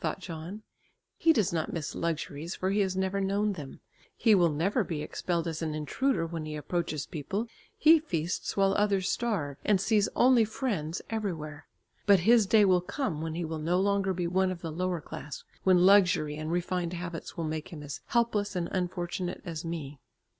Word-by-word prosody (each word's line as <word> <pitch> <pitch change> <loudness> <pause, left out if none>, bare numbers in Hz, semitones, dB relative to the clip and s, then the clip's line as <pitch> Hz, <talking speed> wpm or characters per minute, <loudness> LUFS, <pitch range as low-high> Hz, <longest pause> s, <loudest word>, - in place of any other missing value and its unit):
thought - - -2
John. 180 +4 -7 0.5
"He 330 - +4
does 215 - +2
not 160 -2 -1
miss 155 -3 -3
luxuries, 165 0 -3
for 190 +1 -1
he 205 - +1
has 190 -2 +1
never 190 +1 0
known 200 +2 +1
them; 145 -7 -9 0.4
he 225 - +4
will 175 -4 +5
never 185 - +1
be 160 -5 -4
expelled 170 -2 -2
as 160 -1 -4
an 155 -2 -2
intruder 165 - 0
when 165 -1 -5
he 155 0 -5
approaches 155 0 -2
people; 195 - -3 0.3
he 320 +1 +7
feasts 175 - -3
while 195 0 +4
others 200 -2 +1
starve, 185 - -1
and 205 -2 +3
sees 205 +1 +2
only 250 -2 +5
friends 210 - -3
everywhere. 165 -9 -4 0.4
But 200 -3 +6
his 225 +1 +5
day 210 0 +6
will 185 -2 +4
come 180 - -3
when 160 0 -3
he 170 0 -2
will 160 0 -4
no 170 +4 +1
longer 200 0 +1
be 180 -1 -2
one 185 +2 +2
of 180 -2 -5
the 165 - -4
lower 180 +1 -2
class, 150 0 -8 0.2
when 180 -1 +5
luxury 180 -6 +5
and 155 +1 -4
refined 175 0 -1
habits 170 -1 -6
will 165 - -2
make 155 0 -3
him 155 -3 -8
as 145 -1 -7
helpless 215 -4 +1
and 175 -1 -1
unfortunate 180 0 -3
as 165 -2 -5
me." 155 -4 -5
180 Hz, 190 wpm, -29 LUFS, 160-200 Hz, 0.5 s, he